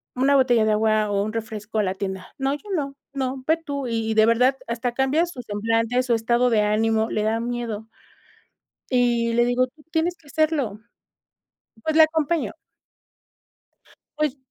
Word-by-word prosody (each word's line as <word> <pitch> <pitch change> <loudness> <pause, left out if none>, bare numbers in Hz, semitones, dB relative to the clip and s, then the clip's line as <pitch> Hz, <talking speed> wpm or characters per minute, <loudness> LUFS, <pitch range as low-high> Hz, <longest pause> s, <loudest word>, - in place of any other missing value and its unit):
una 270 +3 +3
botella 245 -4 +4
de 215 - +2
agua 215 -1 +2
o 200 0 +1
un 215 +1 -4
refresco 220 -1 -4
a 210 - +3
la 190 0 -1
tienda", 190 -1 -5
"No 270 0 0
yo 350 +8 -8
no, 280 -4 -3 0.2
no 260 -1 -3
ve 320 +1 +4
tú", 285 -5 -5
y 225 -1 -1
y - - +1
de 220 0 +5
verdad 250 +3 +4
hasta 235 +1 -2
cambia 270 +6 +2
su 335 -8 -8
semblante, 225 +3 0
su 250 -2 +1
estado 235 +2 +2
de 215 -2 +4
ánimo, 220 +1 +1
le 210 - -1
da 220 +1 +1
miedo. 235 -2 -4 1.0
Y 240 -2 +2
le 240 +1 +3
digo: 245 +1 +2
"Tú 300 +4 -23
tienes 335 +2 0
que 320 - -26
hacerlo", 285 -9 0 1.0
pues 315 0 -1
la 320 - +9
acompaño. 315 -7 0 1.6
Pues 300 -2 0
240 Hz, 175 wpm, -23 LUFS, 220-275 Hz, 1.6 s, la